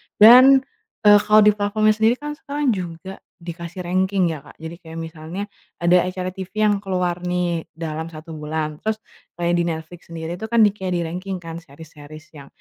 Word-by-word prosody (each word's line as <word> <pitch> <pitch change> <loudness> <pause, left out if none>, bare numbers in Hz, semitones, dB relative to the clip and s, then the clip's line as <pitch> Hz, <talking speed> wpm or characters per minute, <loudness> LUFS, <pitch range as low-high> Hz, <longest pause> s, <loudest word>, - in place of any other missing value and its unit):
Dan, 255 +5 +8 0.4
eee, 205 0 +8
kalau 210 +1 +5
di 210 - +6
platformnya 210 +1 +1
sendiri 220 +2 +2
kan 295 +3 -6
sekarang 285 -2 -1
juga 185 -1 -6 0.2
dikasih 170 +1 -7
ranking 185 0 +1
ya, 155 - -5
Kak. - - -17
Jadi 160 +1 -8
kayak 165 -2 -12
misalnya 165 +3 -6 0.3
ada 175 +1 +3
acara 185 0 -4
TV 190 +3 -4
yang 205 -1 +2
keluar 180 -3 -2
nih, 175 -2 -1
dalam 160 0 -5
1 165 0 -11
bulan. 155 0 -4
Terus 220 0 -1 0.4
kayak 175 0 -1
di - - +2
Netflix 165 +1 -6
sendiri 165 +1 -6
itu 220 - -5
kan 230 0 +4
kayak 190 -3 0
di-ranking 180 +2 -4
kan 165 0 -7
series-series 155 0 -14
yang 140 - -13
180 Hz, 175 wpm, -21 LUFS, 165-205 Hz, 0.4 s, Dan